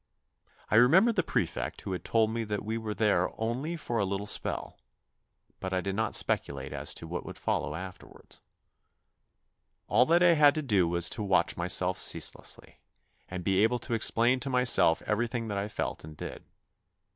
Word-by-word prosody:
I 110 - +5
remembered 185 - +5
the - - +3
prefect - - -2
who 95 - -6
had 90 - -4
told 110 -1 +2
me 115 0 -2
that 105 -1 -4
we 110 +1 -2
were 110 -2 -4
there 100 -5 +2
only 130 +9 -2
for 120 -7 -3
a - - +2
little 100 +1 -2
spell, 105 - -3 0.8
but 95 0 -4
I 95 - +1
did 95 +1 -3
not 110 +2 -1
speculate 70 -1 0
as - - -2
to 80 - -7
what 90 +2 -4
would - - -9
follow 75 - -2
afterwards. 90 +1 -10 1.5
All 120 +5 +4
that 170 +2 +4
I 175 -1 +6
had 150 -2 +5
to 155 - -2
do 100 -9 +2
was 85 0 0
to 110 - -4
watch 95 -4 +1
myself 90 +1 +1
ceaselessly, - - -2 0.5
and 90 -1 -5
be 95 +2 +2
able 115 +3 +3
to 120 0 -6
explain 120 +2 +2
to 135 +2 -4
myself 125 -10 +4
everything 115 +1 -2
that 100 - -3
1 105 - -4
felt - - -4
and 75 -1 -11
did. - - -8
110 Hz, 180 wpm, -29 LUFS, 95-120 Hz, 1.5 s, I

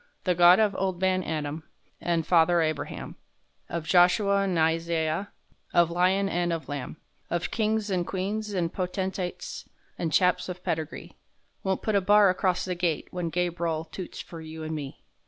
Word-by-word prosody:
The 180 - +2
Gawd 175 +1 +7
of 210 -2 +3
Ol' 190 -1 0
Man 185 +1 +1
Adam 155 -1 -3 0.4
An' 170 -2 0
Father 170 +1 +4
Abraham, 155 -3 -3 0.5
Of 170 -2 -3
Joshua 180 +4 +4
an' 190 -3 0
Isaiah, 165 +2 0 0.4
Of 170 -1 +5
lion 185 +3 +2
an' 175 -2 0
of 165 -5 -3
lamb, 145 +1 -5 0.3
Of 175 0 -2
kings, 215 -2 0
an' 180 -2 0
queens, 205 +4 -3
an' 170 -2 0
potentates, 190 - -4 0.3
An' 165 - 0
chaps 180 +4 +2
of 180 0 -7
pedigree, 160 -1 -4 0.4
Wont 190 -1 -1
put 215 - 0
a 200 - +3
bar 205 0 +6
acrost 185 0 0
the 185 - -2
Gate 175 -3 -1
When 175 -2 -3
Gabr'el 170 -2 -2
toots 185 +1 -7
fer 165 -2 -10
you 160 0 -8
an' 155 0 -4
me. 145 -3 -6
175 Hz, 165 wpm, -27 LUFS, 165-190 Hz, 0.5 s, Gawd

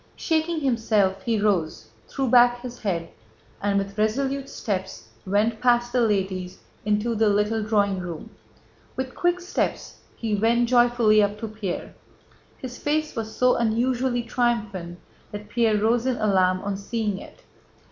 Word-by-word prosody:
Shaking 320 0 0
himself, 220 -7 +1
he 230 -3 0
rose, 175 - 0 0.2
threw 270 -1 -2
back 245 0 +5
his 245 -1 -7
head, 170 -5 -2 0.5
and 200 0 +1
with 200 +1 -3
resolute 270 +5 0
steps 190 -3 -4 0.2
went 215 +3 +1
past 240 -1 +2
the 250 - +3
ladies 190 -4 -1 0.3
into 210 +3 0
the 220 -1 +2
little 210 +2 +1
drawing 205 -3 +1
room. 175 -3 -7 0.6
With 260 0 -4
quick 350 0 +1
steps 360 +1 -3 0.2
he 225 -2 -3
went 230 +3 +2
joyfully 240 -3 +4
up 205 0 0
to 225 - -3
Pierre. 210 -4 -5 0.6
His 250 -1 -8
face 305 +1 -1
was 220 -2 -5
so 250 0 +4
unusually 240 +2 0
triumphant 215 -8 -2 0.3
that 205 0 -8
Pierre 225 -1 +2
rose 230 +4 +1
in 255 - +1
alarm 185 -4 +2
on 200 -1 -3
seeing 210 -1 -2
it. - - -14
220 Hz, 145 wpm, -24 LUFS, 200-245 Hz, 0.6 s, back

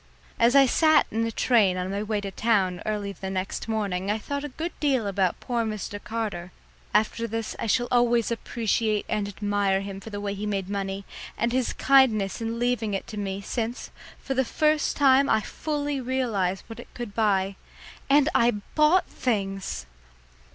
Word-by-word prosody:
As 235 +3 +4
I 275 -1 +8
sat 310 +4 +4
in 225 +1 0
the 230 - -2
train 210 -6 +3
on 185 +1 -3
my 200 +1 -2
way 210 0 -1
to 200 -1 -5
town 190 -5 +1
early 205 -2 -2
the 190 -1 -6
next 190 +3 -3
morning 200 -4 -1
I 210 - +1
thought 280 +6 -4
a 295 - -4
good 325 +6 -4
deal 270 -7 +1
about 195 -2 0
poor 240 -2 -1
Mr. 210 -2 -5
Carter. 210 -6 -4 0.4
After 220 +2 +1
this 225 0 -4
I - - -2
shall 240 +3 +2
always 240 -1 +3
appreciate 225 -2 0
and 210 -2 -1
admire 205 -1 0
him 195 -1 -6
for 220 - -10
the 205 -1 -5
way 205 -1 -3
he 205 +1 -4
made 195 -2 -2
money, 195 -1 -3 0.3
and 235 +1 0
his 255 -1 +1
kindness 235 -7 +3
in 225 +1 -2
leaving 235 -4 0
it 195 - -4
to 215 - -7
me, 195 -1 -3
since, 230 +3 -4 0.3
for 270 - -4
the 265 0 +2
first 305 +3 +1
time 270 -2 +6
in 280 - +3
my - - +3
life, 220 -1 +2
I - - -8
fully 290 -3 -2
realised 230 -8 -1
what 225 - -10
it - - -11
could 240 -4 -6
buy. 200 -3 +1 0.5
And 285 +1 +5
I 235 - +4 0.2
bought 310 +5 +4
things! 195 - -2
220 Hz, 195 wpm, -26 LUFS, 200-245 Hz, 0.5 s, I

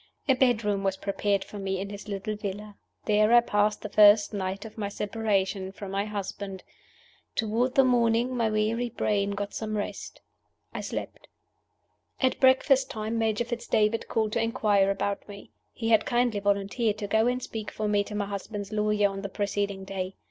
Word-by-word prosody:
A 265 - +6
bedroom 220 -6 +2
was 190 -1 0
prepared 200 0 0
for 205 - -9
me 195 -1 -2
in 200 +1 -5
his 205 +1 -9
little 205 +1 -3
villa. 205 0 -6 0.3
There 215 +1 +3
I 240 - +9
passed 210 -2 +1
the - - -3
first 205 0 +6
night 195 +1 -3
of 220 - -10
my 205 -2 -3
separation 200 -2 -1
from 195 0 -8
my 200 +1 -1
husband. 200 -2 -5 0.7
Toward 230 +3 0
the 270 - +6
morning 240 0 +2
my 230 -2 +1
weary 220 +3 0
brain 200 -3 0
got 200 0 -4
some 215 -1 -3
rest 205 - -5 0.5
I - - -4
slept. - - -6 0.9
At 260 -1 +1
breakfast 265 +1 +4
time 220 +1 -3
Major 225 +1 +1
Fitz 240 0 -5
David 215 +1 +1
called 220 -2 0
to 230 - +1
inquire 210 -4 +2
about 200 0 -2
me. 200 0 -11 0.2
He 225 -1 -3
had 220 -1 +4
kindly 240 -3 +1
volunteered 205 +2 0
to 210 - -4
go 220 +3 +3
and 250 0 -1
speak 220 -2 -5
for 215 - -3
me 205 -1 +2
to 210 - -7
my 205 -1 -1
husband's 205 +1 -6
lawyers 210 -1 +2
on 195 0 -6
the 200 - -5
preceding 200 -1 -2
day. 190 -1 -4
210 Hz, 185 wpm, -27 LUFS, 200-225 Hz, 0.9 s, I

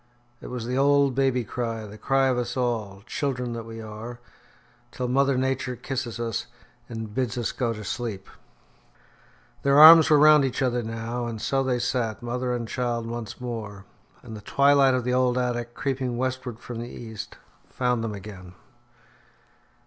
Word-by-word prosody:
It - - -8
was 125 -2 -5
the 125 +2 -1
old 140 -1 +4
baby 135 -2 +1
cry, 115 0 -4
the 105 0 -10
cry 135 +4 +1
of 130 - +2
us 125 +1 -3
all, 110 -6 -2
children 125 -4 -2
that 115 -1 -6
we 115 0 -8
are, 110 +2 -8 0.7
till 125 - -3
mother 135 +1 +2
Nature 130 -1 -1
kisses 125 -1 -4
us 115 -2 -3 0.4
and 110 -2 -6
bids 125 -1 -1
us 120 - -1
go 120 -3 -1
to 105 -1 -6
sleep. 105 -3 -4 1.3
Their 140 0 +3
arms 160 +1 +10
were 150 - +6
round 150 0 +7
each 135 0 -1
other 125 -1 +1
now, 115 +2 -4
and 115 -2 -5
so 135 +4 0
they 130 -2 0
sat, 120 -2 -2
mother 125 +1 -2
and 120 -2 -2
child 120 -1 -2
once 115 -1 -6
more. 110 -5 -6 0.4
And 110 - -9
the 105 - -9
twilight 140 +3 +4
of 125 - -1
the 125 +1 -1
old 125 -1 +2
attic, 120 -1 -2
creeping 130 -3 -2
westward 130 -2 -3
from 120 -1 -7
the 120 +1 -6
east, 110 -4 -8 0.3
found 125 -2 0
them 110 -2 -3
again. 95 -3 -10
120 Hz, 170 wpm, -25 LUFS, 115-130 Hz, 1.3 s, arms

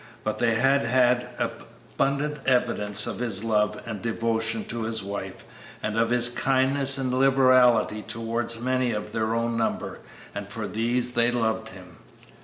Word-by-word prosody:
But 110 - -3
they 115 -2 +2
had 135 +4 +3
had 125 0 +2
abundant 145 +2 -3
evidence 105 -5 +2
of - - -5
his 115 -5 -2
love 105 -2 0
and 110 -4 -6
devotion 115 -1 -1
to 115 0 -5
his 110 -1 -2
wife, 100 +1 -6 0.4
and 110 - -2
of 115 0 +1
his 120 0 +5
kindness 135 +2 +2
and 130 -2 -1
liberality 130 -4 +4
towards 115 +1 -2
many 130 0 0
of 105 0 -5
their 110 0 -1
own 115 0 -1
number, 115 - -2 0.3
and 100 0 -6
for 105 +1 -5
these 120 +2 0
they 120 -1 +3
loved 110 -2 -1
him. 90 -3 -13
115 Hz, 155 wpm, -25 LUFS, 110-125 Hz, 0.4 s, his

